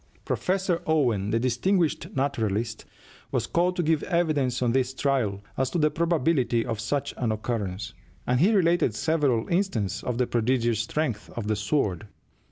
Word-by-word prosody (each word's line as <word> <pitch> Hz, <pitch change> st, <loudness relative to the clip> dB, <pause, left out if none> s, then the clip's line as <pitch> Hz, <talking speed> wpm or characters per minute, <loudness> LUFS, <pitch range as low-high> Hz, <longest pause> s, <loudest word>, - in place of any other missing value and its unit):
Professor 185 Hz, -2 st, 0 dB
Owen, 120 Hz, -11 st, +2 dB
the 115 Hz, -, +1 dB
distinguished 155 Hz, +8 st, +1 dB
naturalist, 115 Hz, -5 st, -1 dB, 0.5 s
was -, -, 0 dB
called 180 Hz, +2 st, +1 dB
to 175 Hz, -, 0 dB
give 160 Hz, -1 st, +2 dB
evidence 150 Hz, -7 st, 0 dB
on 120 Hz, -, +2 dB
this 130 Hz, +1 st, 0 dB
trial 125 Hz, -9 st, 0 dB, 0.2 s
as 130 Hz, -1 st, +1 dB
to 175 Hz, -, -2 dB
the 155 Hz, -2 st, +3 dB
probability 155 Hz, -7 st, +1 dB
of 115 Hz, -3 st, -3 dB
such 135 Hz, +6 st, -2 dB
an 120 Hz, -3 st, 0 dB
occurrence, 105 Hz, -2 st, -3 dB, 0.3 s
and 125 Hz, 0 st, +1 dB
he 185 Hz, +9 st, +5 dB
related 175 Hz, -, +3 dB
several 145 Hz, -6 st, +1 dB
instances 170 Hz, -, 0 dB
of 125 Hz, -2 st, -3 dB
the 125 Hz, -, +2 dB
prodigious 120 Hz, -1 st, +1 dB
strength 115 Hz, -, -2 dB
of 115 Hz, -, -4 dB
the 110 Hz, 0 st, 0 dB
"sword." 105 Hz, -, -1 dB
125 Hz, 160 wpm, -26 LUFS, 110-160 Hz, 0.5 s, he